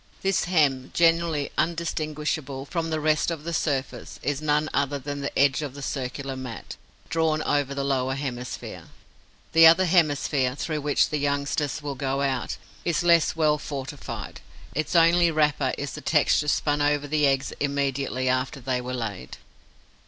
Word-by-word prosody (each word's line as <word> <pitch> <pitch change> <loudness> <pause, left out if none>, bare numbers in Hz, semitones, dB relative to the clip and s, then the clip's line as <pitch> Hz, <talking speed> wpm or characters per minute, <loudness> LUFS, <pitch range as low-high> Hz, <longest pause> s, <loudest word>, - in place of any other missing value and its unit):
This 195 -1 +1
hem, 145 -7 +2
generally 165 -3 +2
undistinguishable 155 -4 -2
from 165 +2 -3
the 160 -1 -1
rest 155 +1 +2
of 165 -3 -4
the 170 +1 -4
surface, 135 -6 -2
is 145 0 -1
none 150 0 +1
other 140 0 0
than 145 +1 -5
the 140 - -4
edge 140 0 +3
of 140 -3 -5
the 140 - -8
circular 135 0 -4
mat, 125 -7 -7 0.3
drawn 160 -1 +1
over 145 -1 0
the 140 - -2
lower 135 -1 0
hemisphere. 125 -3 -6 0.7
The 165 0 +9
other 170 +3 +6
hemisphere, 145 -6 +2
through 155 +1 -3
which 145 0 +2
the 150 - 0
youngsters 145 0 -1
will 145 -1 -3
go 135 0 -2
out, 130 -3 -1 0.3
is 170 0 0
less 170 -2 +4
well 155 -2 +2
fortified: 140 -1 -6 0.3
its 155 +3 -2
only 170 +1 +5
wrapper 150 -4 +1
is 145 -1 -4
the - - -8
texture 150 +1 +2
spun 145 0 +1
over 145 0 +1
the 150 0 +2
eggs 135 0 0
immediately 140 -2 -1
after 130 +2 0
they 125 0 -2
were 125 +1 -4
laid. 105 - -5
145 Hz, 160 wpm, -25 LUFS, 135-155 Hz, 0.7 s, The